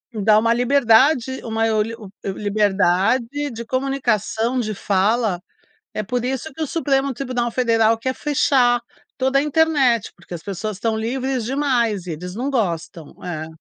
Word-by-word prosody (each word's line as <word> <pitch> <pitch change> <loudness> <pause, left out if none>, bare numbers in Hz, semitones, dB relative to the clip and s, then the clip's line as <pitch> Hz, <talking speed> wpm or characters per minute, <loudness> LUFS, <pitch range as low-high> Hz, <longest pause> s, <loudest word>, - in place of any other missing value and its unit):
Dá 215 0 +4
uma 230 +1 +3
liberdade, 260 +1 +3
uma 225 0 -1
oli 215 +2 0 0.3
liberdade 210 +7 +1
de 235 0 -7
comunicação, 250 -2 0
de 215 -3 -2
fala, 200 0 +1 0.5
é - - -2
por 245 +4 -2
isso 265 +4 -3
que 320 - -12
o 310 - 0
Supremo 275 -3 0
Tribunal 245 -1 -2
Federal 225 -2 +3
quer 260 +3 -2
fechar 260 -4 +2 0.4
toda 265 +1 +2
a 275 - +3
internet, 290 -7 +2
porque 175 - -11
as 165 - -7
pessoas 200 +1 -5
estão 220 0 0
livres 255 +1 -2
demais 240 -8 0
e - - -2
eles 180 +4 -7
não 255 +5 -2
gostam. 170 - -3
É. 160 -3 -4
235 Hz, 150 wpm, -21 LUFS, 210-265 Hz, 0.5 s, Dá